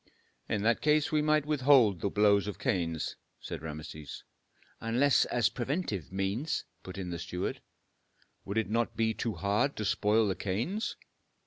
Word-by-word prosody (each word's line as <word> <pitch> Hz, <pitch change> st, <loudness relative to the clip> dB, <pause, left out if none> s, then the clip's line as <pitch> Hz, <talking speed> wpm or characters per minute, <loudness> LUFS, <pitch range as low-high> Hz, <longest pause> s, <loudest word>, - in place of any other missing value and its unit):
"In 105 Hz, -2 st, 0 dB
that 115 Hz, +1 st, +2 dB
case 150 Hz, 0 st, +3 dB
we 155 Hz, -1 st, +3 dB
might 155 Hz, -1 st, +2 dB
withhold 130 Hz, -, +4 dB
the 100 Hz, -, 0 dB
blows 100 Hz, -1 st, +3 dB
of 105 Hz, -, -4 dB
canes," 85 Hz, -, -1 dB, 0.2 s
said -, -, -6 dB
Rameses. 75 Hz, -2 st, -7 dB, 0.6 s
"Unless 125 Hz, +5 st, +3 dB
as 120 Hz, -3 st, +2 dB
preventive 120 Hz, -, -3 dB
means," 100 Hz, +10 st, -1 dB, 0.2 s
put 95 Hz, +1 st, -9 dB
in 90 Hz, -2 st, -4 dB
the 85 Hz, -, -4 dB
steward. 90 Hz, +1 st, -4 dB, 0.8 s
"Would 100 Hz, +3 st, -4 dB
it 110 Hz, -, +1 dB
not 115 Hz, +1 st, 0 dB
be 110 Hz, 0 st, +2 dB
too 115 Hz, 0 st, -3 dB
bad 105 Hz, +8 st, +2 dB
to 105 Hz, -, -3 dB
spoil 110 Hz, +1 st, +2 dB
the 95 Hz, -, 0 dB
canes?" 120 Hz, -, -2 dB
110 Hz, 155 wpm, -30 LUFS, 95-135 Hz, 0.8 s, withhold